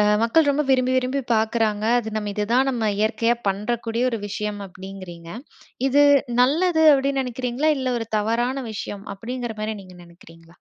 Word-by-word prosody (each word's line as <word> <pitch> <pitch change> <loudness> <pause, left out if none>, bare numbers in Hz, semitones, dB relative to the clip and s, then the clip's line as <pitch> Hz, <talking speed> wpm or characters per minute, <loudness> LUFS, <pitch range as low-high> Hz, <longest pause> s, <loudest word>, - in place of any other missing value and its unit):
அ - - +5 0.2
மக்கள் 285 +7 +3
ரொம்ப 285 +1 +2
விரும்பி, 255 -1 +3
விரும்பி 255 +2 0
பார்க்குறாங்க. 220 -1 0
அது 230 -2 -3
நம்ம 210 -1 -2
இதுதான் 235 +6 +1
நம்ம 240 -4 -2
இயற்கையா 230 +2 +1
பண்றக்கூடிய 225 +4 -2
ஒரு 230 - -2
விஷயம் 210 0 -4
அப்பிடிங்கிறீங்க. 185 -3 -10 0.6
இது 285 +2 +4 0.4
நல்லது 320 +6 +3
அப்பிடின்னு 275 0 +1
நினைக்கிறீங்களா? 250 +4 -1
இல்ல 260 - -2
ஒரு 225 - -5
தவறான 240 +5 -1
விஷயம் 205 -1 -6
அப்பிடிங்கிறமாரி 225 -1 -5
நீங்க 185 -1 -14
நினைக்கிறீங்களா? 165 -1 -18
230 Hz, 145 wpm, -23 LUFS, 210-255 Hz, 0.6 s, அ